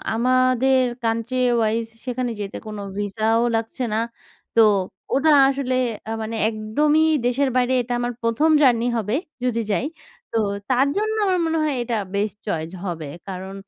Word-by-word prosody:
আমাদের 255 +2 +3 0.2
country 230 +3 -1 0.2
wise 225 0 +1 0.2
সেখানে 250 -1 -2
যেতে 200 0 -5
কোনো 210 -1 -6 0.2
ভিসাও 220 +3 +1
লাগছে 225 +3 -2
না, - - +1 0.6
তো 230 - +7 0.5
ওটা 290 +4 +3 0.2
আসলে 270 -2 -1 0.4
আ - - -2
মানে 220 +1 -4
একদমই 290 +9 +1 0.2
দেশের 265 +3 +2
বাইরে 255 0 +2
এটা 245 +1 -4
আমার 240 0 -1
১ম 230 +7 +2
জার্নি 240 -4 +4
হবে, 220 +2 -1 0.3
যদি 235 -2 0
যাই। 200 +6 0 0.5
তো 230 - -1 0.6
জন্য 435 +1 0
আমার 370 -2 +2
মনে 325 0 0
হয় 300 -2 0
এটা 235 -1 -2 0.2
বেস্ট 205 0 -1
চয়েস 160 -4 -2
হবে 165 -4 -4 0.2
কারণ 190 0 -6
230 Hz, 150 wpm, -22 LUFS, 215-260 Hz, 0.6 s, তো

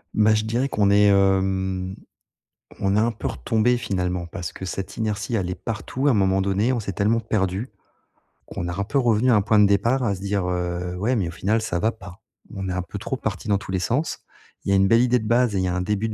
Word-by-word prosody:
Bah, 110 0 +4
je 110 - 0
dirais 120 +5 0
qu'on 100 -5 +2
est, 105 +1 +5
hem, 95 -1 +1 0.8
on 95 0 +1
est - - +4
un 115 +2 +2
peu 110 - -5
retombé, 115 - +1
finalement, 90 -5 -2
parce 85 0 -6
que 95 - -8
cette 95 +1 -5
inertie, 110 +1 -2
elle 95 -5 -1
est - - -1
partout 115 +7 -3
à - - +5
un - - +2
moment 95 -1 +2
donné, 100 +6 +1
on 120 - -1
s'est 100 -3 -4
tellement 105 +5 +1
perdu 100 +1 -1 0.8
qu'on 85 - -5
a 90 +3 -4
un - - +1
peu 110 +7 0
revenu 120 0 +3
à - - +5
un 105 - +4
point 105 +2 +2
de 105 - +7
départ 115 +7 +2
à 105 -4 +1
se 95 - -7
dire: 100 -1 -1
«Heu, 90 0 -2
ouais, 115 +7 0
mais 100 -7 0
au - - -6
final, 105 +6 0
ça 85 -5 -2
va 110 +5 +1
pas». 100 -2 -13 0.3
On 95 -1 -4
est - - -1
un 90 0 -2
peu 100 +3 -7
trop 135 - -3
parti 100 -5 -4
dans 100 -2 +3
tous 95 - -8
les 95 - 0
sens. 125 - -1 0.4
Il - - -4
y - - +3
a - - +5
une 95 0 +4
belle 115 +4 +5
idée 125 0 +3
de 110 -3 -4
base 120 -1 +2
et - - +1
il 95 - +1
y - - 0
a 90 - -1
un 90 - -1
début 105 +3 -1
de 110 - -4
100 Hz, 270 wpm, -23 LUFS, 95-110 Hz, 0.8 s, de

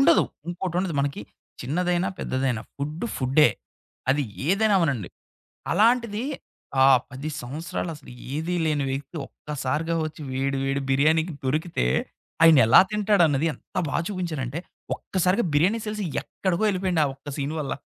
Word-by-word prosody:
ఉండదు. 330 +4 +6 0.2
ఇంకోటుండదు. 175 -1 -2
మనకి 140 -5 -2 0.4
చిన్నదైనా, 175 +7 0
పెద్దదైనా 130 -4 -1
ఫుడ్ 150 +7 -4
ఫుడ్డే. 135 +2 +4 0.6
అది 145 +2 +2 0.2
ఏదైనా 205 +3 +3
అవ్వనీయండి. 140 - 0 0.6
అలాంటిది 230 +2 +3 0.6
ఆ - - +7 0.2
10 135 +4 -5
సంవత్సరాలసలు 155 +2 -5 0.2
ఏదీ 160 +4 -2
లేని 150 -3 +1
వ్యక్తి 140 +4 -5
ఒక్కసారిగా 150 +4 -3
ఒచ్చి 155 0 -9
వేడి 135 +1 -1
వేడి 135 0 0
బిర్యానీకి 155 +5 +3
దొరికితే 155 - 0 0.6
ఆయనెలా 135 -7 +8
తింటాడన్నది 175 -8 +3
ఎంత - - -18
బా - - -1
చూపించాడంటే, 165 -8 -3 0.4
ఒక్కసారిగా 185 +4 0
బిర్యానీ 180 +10 +3
సేల్స్ 210 0 -3 0.2
ఎక్కడికో 185 +1 -1
ఎళ్ళిపోయాయండి 185 -4 +1
ఆ - - +2
ఒక్క 135 +2 -14
సీన్ 145 +2 -2
వల్ల. 140 - -3
160 Hz, 125 wpm, -25 LUFS, 140-185 Hz, 0.6 s, ఆయనెలా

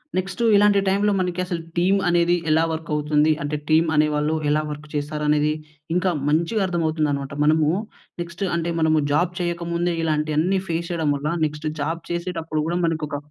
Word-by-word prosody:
Next, 190 +5 -2
ఇలాంటి 205 0 +5
టైమ్‌లో 200 +2 +2
మనకి 180 -1 -2
అసలు 175 -2 -3 0.2
టీమ్ 185 +3 +3
అనేది 175 0 +3
ఎలా 160 +1 +4
వర్క్ 160 0 -5
అవుతుంది 150 +1 +2
అంటే, 145 +1 -2
టీమ్ 160 +1 +4
అనేవాళ్ళు 150 +1 +2
ఎలా 150 +1 +2
వర్క్ 150 0 -7
చేస్తారు 150 +1 -3
అనేది, 150 0 +3 0.4
ఇంకా 180 0 +2 0.2
మంచిగా 170 +8 +1
అర్థం 170 -2 -1
అవుతుందన్నమాట. 145 -3 -1
మనము 155 0 +3 0.5
నెక్స్ట్ 170 +2 -5
అంటే, 170 0 -1
మనము 160 -1 +3
జాబ్ 175 +4 +1
చేయకముందే, 170 0 -1
ఇలాంటి 155 -1 0
అన్ని 185 +4 +2
ఫేస్ 170 +1 -2
చేయడం 160 -4 0
వల్ల, 140 +2 -4 0.2
నెక్స్ట్ 150 +1 -4
జాబ్ 165 +3 -2
చేసేటప్పుడు 165 -3 -2
కూడా 170 +1 0
మనకొక 155 -3 -2
160 Hz, 165 wpm, -23 LUFS, 150-175 Hz, 0.5 s, ఇలాంటి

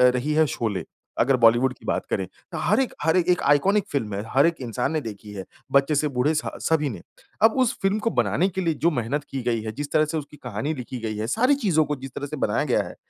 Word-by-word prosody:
रही 145 +5 -1
है 155 0 +4
शोले, 105 -8 -2 0.4
अगर 130 +3 +4
बॉलीवुड 120 +3 +5
की - - -18
बात - - -1
करें - - -1 0.3
त - - -4
हर - - +3
एक, 265 - 0
हर 160 +3 +3
ए 180 - +4
एक 180 - +3
आइकोनिक 185 +9 +3
फ़िल्म 110 -8 -2
है, 100 - -3
हर 140 +3 +5
एक 170 0 +2
इंसान 120 +4 -2
ने 155 -2 -1
देखी 105 -2 -8
है, 95 -2 -5 0.3
बच्चे 140 +2 +3
से 150 +1 +2
बूढ़े 145 +5 +3
स 155 - +1 0.2
सभी 155 -3 +2
ने। 110 - -7 0.4
अब 220 - +6
उस 235 - 0
फ़िल्म 195 +2 +1
को 230 - 0
बनाने 185 -3 +1
के 190 +1 -3
लिए 165 -2 +1
जो 170 - +5
मेहनत 135 +2 -2
की 135 - -4
गई 115 -2 0
है, 110 - -4
जिस 145 +5 -6
तरह 155 0 +4
से 160 +1 -3
उसकी 150 0 -7
कहानी 125 +6 -3
लिखी 125 -2 -6
गई 110 -2 -4
है, 110 +1 -2
सारी 255 - +3
चीज़ों 180 - +2
को 150 +1 -2
जिस 135 0 -9
तरह 145 - -3
से - - -6
बनाया - - +1
गया - - +1
है, - - -9
145 Hz, 265 wpm, -24 LUFS, 120-160 Hz, 0.4 s, अब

